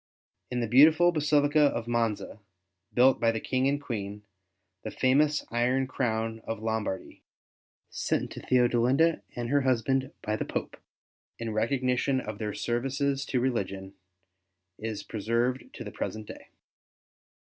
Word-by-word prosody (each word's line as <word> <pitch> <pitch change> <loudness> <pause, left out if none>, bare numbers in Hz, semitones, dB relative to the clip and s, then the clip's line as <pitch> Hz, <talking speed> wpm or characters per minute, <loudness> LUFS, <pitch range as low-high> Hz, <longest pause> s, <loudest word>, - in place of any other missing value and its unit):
In 125 -1 -2
the 115 - -1
beautiful 155 +8 +6
basilica 150 -1 +3
of 120 -5 +2
Monza, 115 -3 -1 0.5
built 130 +2 +4
by 115 - +3
the 115 - -3
King 130 +4 0
and 140 +1 +1
Queen, 105 -6 -5 0.6
the - - -5
famous 145 +3 +2
iron 125 +3 +1
crown 115 -3 -2
of 115 -1 -4
Lombardy, 110 -4 -3 0.7
sent - - -1
to - - -7
TheodeHnda 125 +6 +3
and 120 -1 -3
her 145 0 +3
husband 130 +1 +1
by 105 - -1
the - - -2
Pope, - - -4 0.6
in 115 -1 -4
recognition 130 +3 +1
of 105 -4 -6
their 105 -2 -3
services 135 +3 -1
to 130 - 0
religion, 100 -6 -2 0.9
is 110 -1 -4
preserved 115 +4 -1
to - - -7
the - - -7
present 110 0 -5
day. - - -11
125 Hz, 135 wpm, -28 LUFS, 110-135 Hz, 0.9 s, beautiful